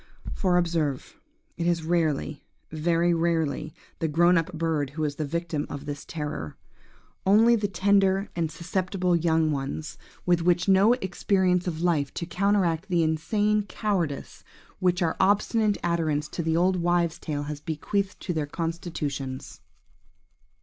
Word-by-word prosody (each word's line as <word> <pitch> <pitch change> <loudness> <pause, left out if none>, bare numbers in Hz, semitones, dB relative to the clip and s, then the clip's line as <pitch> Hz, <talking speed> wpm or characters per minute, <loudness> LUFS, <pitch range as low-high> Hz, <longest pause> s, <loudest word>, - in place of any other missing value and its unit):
For, 180 -3 +2
observe, 165 - -1 0.4
it 170 - -1
is 170 -2 +1
rarely–very 160 +1 -1
rarely–the 165 -1 -2
grownup 170 +2 +3
bird 160 -4 -1
who 155 - -1
is 145 -1 -2
the 155 - -1
victim 165 0 -3
of 145 0 -6
this 145 0 -6
terror. 150 - -5 0.7
Only 220 +5 +5
the 210 -2 0
tender 195 0 +2
and 165 -2 0
susceptible 180 +2 -1
young 160 -1 +2
ones, 135 - -4 0.3
with 175 +1 +2
no 195 +4 +6
experience 190 -4 +1
of 165 -1 -3
life 150 -6 +1
to 170 - -3
counteract 190 -1 +1
the 175 -2 +2
insane 205 +7 +1
cowardice 180 -12 -2 0.4
which 180 -1 +2
our 160 - 0
obstinate 205 +2 +2
adherence 160 -4 0
to - - -4
the 160 0 0
old 185 +2 +3
wife's 175 -1 +1
tale 145 -2 -3
has 145 0 -6
bequeathed 190 +6 -2
to 180 - -2
their 155 -3 -2
constitutions. 150 -5 -4
170 Hz, 135 wpm, -26 LUFS, 155-185 Hz, 0.7 s, no